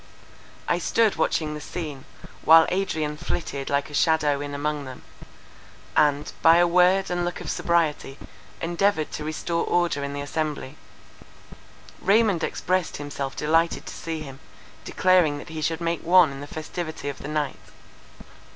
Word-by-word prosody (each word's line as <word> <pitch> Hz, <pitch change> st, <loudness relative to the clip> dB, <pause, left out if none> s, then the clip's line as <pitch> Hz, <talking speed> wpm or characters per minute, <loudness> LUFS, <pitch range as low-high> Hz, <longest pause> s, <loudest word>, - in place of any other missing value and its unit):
I -, -, +1 dB
stood 225 Hz, -3 st, +2 dB
watching 155 Hz, -1 st, 0 dB
the 150 Hz, -, -7 dB
scene, 150 Hz, -5 st, -6 dB, 0.4 s
while 160 Hz, 0 st, +8 dB
Adrian 160 Hz, -5 st, -1 dB
flitted 140 Hz, -4 st, -4 dB
like 140 Hz, 0 st, 0 dB
a -, -, -11 dB
shadow 150 Hz, -2 st, +2 dB
in 145 Hz, 0 st, -5 dB
among 145 Hz, 0 st, -2 dB
them, 130 Hz, -1 st, -10 dB, 0.9 s
and, 145 Hz, -1 st, +2 dB
by 165 Hz, 0 st, +7 dB
a 175 Hz, -, +5 dB
word 180 Hz, +2 st, +3 dB
and 175 Hz, 0 st, 0 dB
look 175 Hz, 0 st, -3 dB
of -, -, -4 dB
sobriety, 160 Hz, -5 st, 0 dB, 0.4 s
endeavoured 170 Hz, -1 st, 0 dB
to 150 Hz, -, -5 dB
restore 160 Hz, +2 st, -2 dB
order 175 Hz, -5 st, 0 dB
in 140 Hz, 0 st, -4 dB
the 145 Hz, -, -4 dB
assembly. 150 Hz, -1 st, -3 dB, 1.3 s
Raymond 200 Hz, -3 st, +3 dB
expressed 185 Hz, -1 st, -1 dB
himself 140 Hz, -2 st, -5 dB
delighted 165 Hz, +2 st, +1 dB
to -, -, -7 dB
see 165 Hz, -1 st, -5 dB
him, 135 Hz, -2 st, -9 dB, 0.5 s
declaring 180 Hz, -6 st, +3 dB
that 145 Hz, -, -10 dB
he 160 Hz, 0 st, -6 dB
should 165 Hz, +2 st, -1 dB
make 170 Hz, 0 st, -1 dB
one 175 Hz, -2 st, +5 dB
in 135 Hz, 0 st, -8 dB
the 145 Hz, -, -7 dB
festivity 160 Hz, 0 st, -6 dB
of 140 Hz, -, -5 dB
the -, -, -7 dB
night. 150 Hz, -2 st, -2 dB
155 Hz, 155 wpm, -24 LUFS, 145-175 Hz, 1.3 s, while